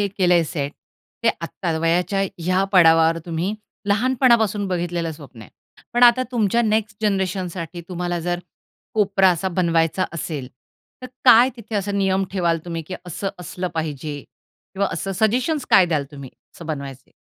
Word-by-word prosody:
हे 200 - +1
केलंय 180 -3 +2
सेट, 145 -3 -4 0.5
ते - - +5
आत्ता 165 0 -3
वयाच्या 175 +4 +1 0.2
ह्या 185 +2 +2
पडावावर 165 -2 +5
तुम्ही 170 +5 -2 0.3
लहानपणापासून 225 -2 +2
बघितलेलं 175 -2 -2
स्वप्न 140 -7 -12
आहे. - - -15 0.4
पण 240 - +2
आता 245 +1 +7
तुमच्या 235 0 +2
नेक्स्ट 215 -1 0
जनरेशनसाठी 185 -4 -2
तुम्हाला 175 -1 -3
जर 175 +1 -2 0.6
कोपरा 195 -3 +4
असा 175 +2 -1
बनवायचा 170 -1 +1
असेल, 150 -5 -5 0.5
तर - - -5 0.2
काय 245 0 +8
तिथे 225 -1 -9
असा 200 0 -2
नियम 195 -1 +1
ठेवाल 170 -4 +1
तुम्ही, 165 -1 -4
की 185 +4 -7
असं 185 +3 -3
असलं 180 +1 -4
पाहिजे 150 -2 -4 0.6
किंवा 200 +1 0
असं 195 - -3
सजेशन्स 245 - 0
काय 185 -2 +7
द्याल 155 -4 0
तुम्ही 140 -2 -9 0.2
असं 170 - -11
बनवायचे? 140 -4 -6
180 Hz, 150 wpm, -21 LUFS, 165-205 Hz, 0.6 s, काय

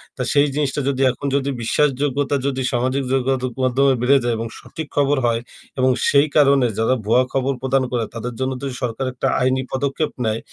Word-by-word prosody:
তা 130 - -6
সেই 145 0 +4
জিনিসটা 145 -1 0
যদি 135 -1 -1
এখন 135 +3 -6
যদি 140 0 0
বিশ্বাসযোগ্যতা 140 +2 +1
যদি 135 -1 -2
সামাজিক 130 +3 0
যোগাযোগ 130 -1 0
মাধ্যমে 130 +2 +3
বেড়ে 135 +3 +5
যায় 120 - 0
এবং 115 - -3
সঠিক 160 -2 -8
খবর 145 0 +2
হয় 115 -1 +1 0.4
এবং 130 0 +4 0.2
সেই 140 +1 +4
কারণে 140 -3 +5
যারা 115 +3 +2
ভুয়া 120 +4 +4
খবর 135 0 0
প্রদান 130 0 +1
করে 120 -2 0
তাদের 120 +1 -5
জন্য 130 0 -1
যদি 135 -2 -4
সরকার 125 +2 -2
একটা 125 - -2
আইনি 130 +1 +2
পদক্ষেপ 140 +3 -1
নেয়। 110 0 0
130 Hz, 190 wpm, -20 LUFS, 125-140 Hz, 0.4 s, বেড়ে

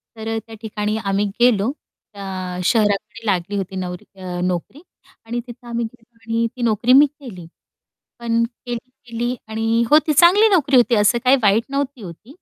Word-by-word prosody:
तर 220 0 -8
अ, - - -1
त्या 225 - -10
ठिकाणी 210 -1 -3
आम्ही 195 +1 +1
गेलो. 240 -1 +3 0.4
त्या 185 -2 -6
शहराकडे 215 +2 0
लागली 195 -1 -1
होती 190 -1 -4
नवरी 180 -1 -5 0.2
अ, 180 -1 -5
नोकरी 180 - -3 0.4
आणि 235 +2 -3
तिथं 240 0 -12
आम्ही 235 0 -2
गेलो 230 0 -15
आणि 230 +1 -1
ती 250 - -8
नोकरी 235 +2 +2
मी 285 +2 +8
केली. 255 - -10 0.7
पण 230 -1 0
केली-केली 240 0 -6
आणि 225 +1 0
होती 305 +1 +5
चांगली 365 +9 +6
नोकरी 300 -9 +3
होती 245 0 +4
असं 210 +3 +3
काही 260 +2 +6
वाईट 210 +2 +3
नव्हती 275 -3 -3
होती. 195 - -11
230 Hz, 165 wpm, -20 LUFS, 205-250 Hz, 0.7 s, मी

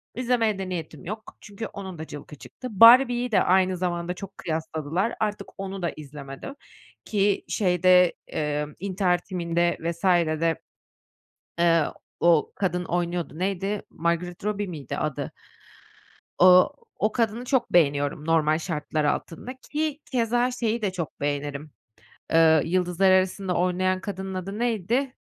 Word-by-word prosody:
İzlemeye 235 -4 +1
de 190 -1 -4
niyetim 165 -4 -6
yok 215 +4 -7
çünkü 205 +2 -7
onun 190 -3 -8
da 160 - -6
cılkı 145 +1 -9
çıktı. 255 - -10
”Barbie”yi 240 +3 +7
de - - +4
aynı 185 0 +3
zamanda 175 -1 -2
çok 195 +1 -10
kıyasladılar. 160 +5 -2
Artık 210 -1 -2
onu 195 -1 -5
da 170 - -1
izlemedim 145 - -9 0.5
ki 200 -1 +1
şeyde, 180 -2 +4
eee, 150 -1 -2
”İntihar 185 -1 +1
Timi”nde 175 -2 -1
vs. 170 +1 -4 0.4
de, 165 -1 +1 1.0
eee, 165 -2 +4 0.4
o 170 -3 +3
kadın 180 -2 -1
oynuyordu. 175 -2 -2
Neydi, 195 +2 -2
Margaret 170 +2 -2
Robbie 205 -1 -1
miydi 155 -8 -6
adı? 150 -3 -3 1.1
O 180 0 +7 0.3
o 215 +1 +1
kadını 230 0 -1
çok 260 0 0
beğeniyorum 145 -2 +2
normal 155 -1 +3
şartlar 155 -2 -2
altında 165 +10 -2
ki 300 +2 -3
keza 240 +1 +1
şeyi 235 -2 -2
de 195 -3 0
çok 170 -4 -6
beğenirim, 145 +1 -3 0.6
ııı, 160 -2 +6
”Yıldızlar 180 +2 +2
Arasında” 185 0 +2
oynayan 185 +1 +1
kadının 190 -1 -5
adı 190 +3 -5
neydi? 240 +3 0
185 Hz, 135 wpm, -25 LUFS, 165-205 Hz, 1.1 s, Barbie”yi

